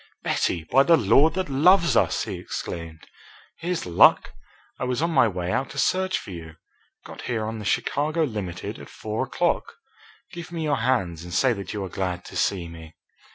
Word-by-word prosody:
"Betty, 85 -3 0
by 130 +12 +4
the 165 +4 +5
Lord 145 - +4
that 185 0 -1
loves 170 +6 +4
us!" - - +2
he - - -5
exclaimed. 80 -2 -6 0.5
"Here's 175 +1 -2
luck! 85 -1 +5 0.5
I - - -3
was 125 0 -1
on 165 +2 0
my 125 - +5
way 90 -3 -3
out 135 - -1
to 140 - -10
search 185 +5 +1
for - - -8
you. 80 -2 -9 0.5
Got - - -10
here 110 -3 -1
on 110 0 -4
the 105 - -7
Chicago 155 +9 0
Limited 105 - -4
at - - -11
four 110 0 -3
o'clock. - - -1 0.6
Give 170 0 -8
me 165 -2 -3
your 150 -2 +1
hands 95 -10 0
and 90 - -9
say 125 +8 +3
that 100 -4 -6
you 100 - -3
are - - -7
glad 90 -2 -3
to - - -11
see 90 -4 0
me." 80 -1 -12
110 Hz, 195 wpm, -24 LUFS, -, 0.6 s, the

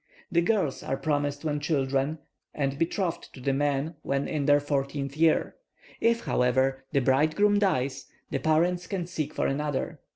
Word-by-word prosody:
The 170 - +3
girls 180 -7 0
are 135 - -2
promised 145 -1 -1
when 150 -1 0
children, 140 0 0 0.4
and 140 -1 -1
betrothed 170 0 -1
to - - -11
the 135 +2 0
man 145 +3 0
when 140 0 -1
in 150 -3 -1
their 145 0 +6
fourteenth 140 -1 -2
year; 160 0 +2 0.4
if, 230 0 +2
however, 130 +2 +1
the 140 - +2
bridegroom 155 +11 +3
dies, 135 -9 0 0.2
the 135 - 0
parents 175 +4 +1
can 190 -4 -2
seek 155 -4 -3
for - - -1
another. 145 0 -2
145 Hz, 160 wpm, -27 LUFS, 135-165 Hz, 0.4 s, their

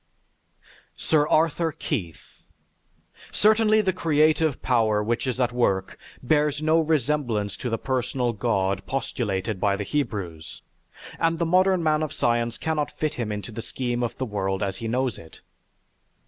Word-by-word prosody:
SIR 150 -2 +2
ARTHUR 160 +1 +2
KEITH 90 - -5 0.9
Certainly 215 0 +4
the 190 -2 0
creative 155 -3 +2
power 110 -4 +2
which 120 +4 -1
is 130 0 -2
at 125 -1 +2
work 95 -6 0 0.3
bears 150 +2 +2
no 155 +1 +3
resemblance 140 -9 0
to 125 - -4
the 115 - -1
personal 125 -1 -1
God 100 -3 0
postulated 110 -6 -2
by 100 0 +2
the 105 - -3
Hebrews, 95 - -4 0.6
and 165 0 +1
the 170 - 0
modern 185 +1 +3
man 155 -1 +2
of 155 -1 -3
science 120 -1 0
cannot 155 -2 -1
fit 155 -1 -1
Him 115 -3 -3
into 105 +3 -5
the 115 +1 -6
scheme 120 +1 -3
of 120 - -2
the 130 - -2
world 95 -3 -2
as 95 -1 -2
he 115 - -5
knows 125 -1 -1
it. 80 - -15
125 Hz, 150 wpm, -25 LUFS, 105-155 Hz, 0.9 s, Certainly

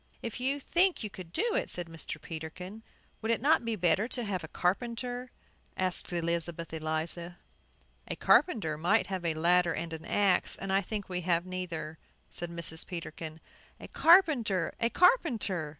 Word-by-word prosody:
"If 230 0 -4
you 270 +3 0
think 350 +2 +2
you 210 - -5
could 180 -4 -10
do 445 - 0
it," - - 0
said 175 - -3
Mr. 165 -1 -7
Peterkin. 180 +6 -7 0.4
"Would 220 - -3
it 230 - +2
not 295 +3 +3
be 230 -1 -1
better 180 +3 +2
to 245 -1 -3
have 190 -5 -3
a - - -6
carpenter?" 245 +8 -2 0.5
asked 185 -1 +3
Elizabeth 170 -1 -1
Eliza. 160 +2 -3 0.7
"A - - -3
carpenter 160 - +3
might 190 +5 +3
have 185 -2 -3
a 165 -2 0
ladder 175 +1 +3
and 165 -1 -4
an 160 0 -7
axe, 200 -2 +2
and 195 0 -3
I 195 - +4
think 205 +1 -5
we 180 -1 -3
have 170 0 +1
neither," 170 -4 -5 0.3
said 175 - -5
Mrs. 170 -1 -1
Peterkin. 160 -2 -7 0.4
"A - - -9
carpenter! 285 - +4
A 230 - +2
carpenter!" 235 - +2
185 Hz, 165 wpm, -30 LUFS, 165-230 Hz, 0.7 s, I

